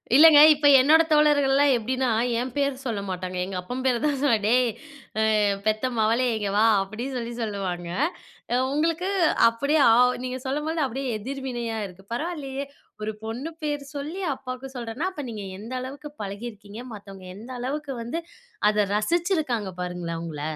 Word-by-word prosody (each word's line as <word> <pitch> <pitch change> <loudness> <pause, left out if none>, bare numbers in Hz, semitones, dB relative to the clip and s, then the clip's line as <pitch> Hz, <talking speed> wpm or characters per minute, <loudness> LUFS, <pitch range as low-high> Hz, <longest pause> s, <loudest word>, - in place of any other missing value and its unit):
இல்லங்க. 305 0 +9
இப்ப 295 0 +2
என்னோட 305 +5 +6
தோழர்கள்லாம் 285 -2 +4
எப்டின்னா, 255 +2 -1 0.3
என் 250 +1 -3
பேரு 280 -1 +1
சொல்ல 225 -5 -2
மாட்டாங்க 185 0 -4
எங்க 190 0 -6
அப்பன் 250 +8 -5
பேர 250 -2 +2
தான் 290 -2 +1
சொல்லுவாங்க. 230 -8 +2
டேய் 250 +2 +4 0.7
ஆ 205 -1 +2
பெத்த 215 +4 +1
மவளே 225 +4 +2
இங்கே 205 -2 -2
வா? 215 - +5 0.2
அப்டின்னு 235 +7 -6
சொல்லி 240 0 -4
சொல்லுவாங்க. 190 -5 -3 0.6
அ - - +3 0.2
உங்களுக்கு 330 +5 0 0.4
அப்டியே 280 +7 0
ஆ - - +7 0.3
நீங்க 255 0 -4
சொல்லும்போது 300 +4 -1
அப்டியே 265 0 -3
எதிர்வினையா 245 -2 -4
இருக்கு. 190 +1 -16
பரவாயில்லையே 280 -1 -4 0.4
ஒரு 215 - -2
பொண்ணு 235 +8 -4
பேர் 295 -1 -2
சொல்லி 305 +7 -5
அப்பாவுக்கு 255 0 -7
சொல்றன்னா 245 +7 -3
அப்ப 300 -6 -6
நீங்க 210 -3 -6
எந்த 230 +4 -8
அளவுக்கு 280 +3 -8
பழகியிருக்கீங்க. 205 +1 -7
மத்தவங்க 195 -2 -11
எந்த 230 +4 -11
அளவுக்கு 280 +2 -3
வந்து 270 +9 -3 0.5
அத 210 -1 +1
ரசிச்சிருக்காங்க 295 - 0
பாருங்களேன் 175 -2 -4
உங்கள. 155 -3 -6
250 Hz, 150 wpm, -25 LUFS, 210-285 Hz, 0.7 s, இல்லங்க